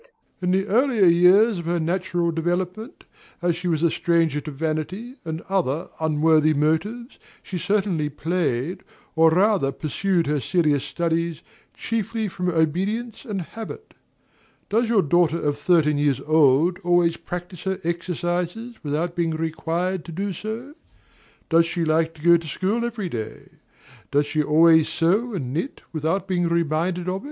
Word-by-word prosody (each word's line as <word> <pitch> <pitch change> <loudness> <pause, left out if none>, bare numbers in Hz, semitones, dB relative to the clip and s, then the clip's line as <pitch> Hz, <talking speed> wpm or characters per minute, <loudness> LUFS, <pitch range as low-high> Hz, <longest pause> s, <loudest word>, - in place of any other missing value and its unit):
In 180 - 0
the 190 +1 +2
earlier 230 0 +3
years 180 +5 +5
of 170 - -7
her 170 +1 0
natural 175 0 -1
development, 180 - -3 0.4
as 175 -1 0
she 175 +1 -5
was 165 -2 0
a 170 - +3
stranger 165 -4 +1
to 155 - -7
vanity 160 - -4
and 160 0 -4
other 175 -5 -1
unworthy 155 0 +3
motives, 205 - -1 0.2
she 180 - -5
certainly 190 -6 0
played, 165 +1 -2 0.3
or 160 0 +6
rather 185 -4 +2
pursued 170 +4 -1
her 150 0 0
serious 150 - +1
studies, 170 -1 -2 0.3
chiefly 225 -1 -2
from 180 -1 -3
obedience 190 +8 -1
and 200 -6 -3
habit. 225 - -9 0.8
Does 225 +2 +2
your 215 -5 +3
daughter 170 +1 +2
of 145 -1 -1
thirteen 150 -3 +3
years 145 -3 +1
old 155 +3 +3
always 175 -2 +2
practise 175 0 -7
her 190 0 -1
exercises 175 +6 -3
without 160 +4 -2
being 165 -2 0
required 165 +3 -2
to - - -8
do 195 +4 -3
so? 225 - -6 0.7
Does 165 0 +4
she 170 0 -2
like 160 +1 +1
to 150 - -15
go 170 0 +7
to 165 -1 -9
school 195 +9 -1
every 225 -5 -3
day? 110 -8 -6 0.6
Does 145 +1 +2
she 155 +1 0
always 160 +1 +5
sew 205 +8 +1
and 130 -7 -4
knit 170 - -4
without 165 +5 -1
being 175 -2 0
reminded 170 +2 0
of 185 +1 -1
it? - - -6
170 Hz, 155 wpm, -23 LUFS, 160-190 Hz, 0.8 s, go